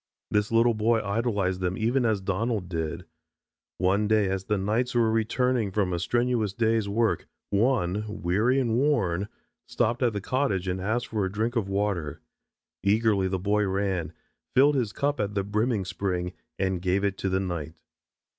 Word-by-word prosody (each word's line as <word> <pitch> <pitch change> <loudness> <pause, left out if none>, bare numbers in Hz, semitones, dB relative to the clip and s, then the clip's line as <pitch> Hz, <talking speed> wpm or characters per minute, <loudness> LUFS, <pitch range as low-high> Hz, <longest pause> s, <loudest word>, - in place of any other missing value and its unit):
This 105 +1 +1
little 115 +1 +4
boy 110 +1 +2
idolized 100 -3 0
them 90 0 -1
even 120 +3 +1
as 105 -3 +1
Donald 100 +1 -1
did. 85 0 -4 0.7
One 100 +3 +2
day 105 -2 +3
as 95 0 -2
the 105 -1 0
knights 110 +6 0
were 115 -2 +3
returning 115 0 +1
from 95 -2 0
a 85 - -1
strenuous 120 0 0
day's 110 -1 +1
work, 110 +2 0 0.2
one, 105 -2 +1
weary 105 +6 +1
and 120 -4 0
worn, 105 - +1 0.4
stopped 120 +3 0
at 120 -3 +2
the 100 - -2
cottage 100 -5 -1
and 90 0 -2
asked 110 +5 -1
for 110 -3 -2
a 95 - -1
drink 110 +4 -1
of 105 -5 0
water. 95 -7 -1 0.6
Eagerly 100 -1 +2
the 95 0 -1
boy 105 +3 +1
ran, 95 -4 -1 0.4
filled 140 +3 +6
his 125 -7 0
cup 145 +4 -1
at 105 0 -2
the 100 - +1
brimming 105 +1 0
spring, 90 -1 -2 0.2
and 95 -2 -1
gave 95 +2 +1
it 100 -1 0
to 95 - -1
the 95 0 +1
knight. 85 -5 -4
105 Hz, 175 wpm, -27 LUFS, 95-115 Hz, 0.7 s, filled